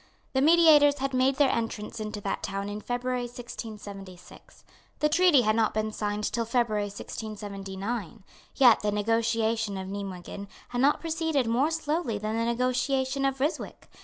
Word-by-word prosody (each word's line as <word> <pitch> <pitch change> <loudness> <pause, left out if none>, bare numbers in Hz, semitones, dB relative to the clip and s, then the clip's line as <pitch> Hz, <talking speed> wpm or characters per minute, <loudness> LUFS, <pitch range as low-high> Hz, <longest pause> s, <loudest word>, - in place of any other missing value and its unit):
The 265 - +2
mediators 300 -2 +6
had 270 0 -2
made 260 +1 +3
their 275 -1 +3
entrance 225 -1 -3
into 215 -1 -4
that 195 - -3
town 195 +1 -3
in 205 +1 -5
February 245 +1 -2
1676. 205 -6 -10 0.3
The 300 - +2
treaty 340 -4 +5
had 215 0 +2
not 225 -2 +1
been 215 0 -1
signed 210 0 -3
till 235 +2 -1
February 230 -3 0
1679. 205 0 -6 0.3
Yet 245 -5 +6
the 210 - -1
negotiation 225 0 0
of 190 0 -5
Nimeguen 195 0 -6 0.2
had 245 0 -2
not 285 +2 +3
proceeded 320 -4 0
more 245 +7 +2
slowly 320 -6 -1
than 215 +1 -3
the 230 0 0
negotiation 255 +3 0
of 270 -1 0
Ryswick. 295 +5 -3
230 Hz, 155 wpm, -27 LUFS, 210-265 Hz, 0.3 s, mediators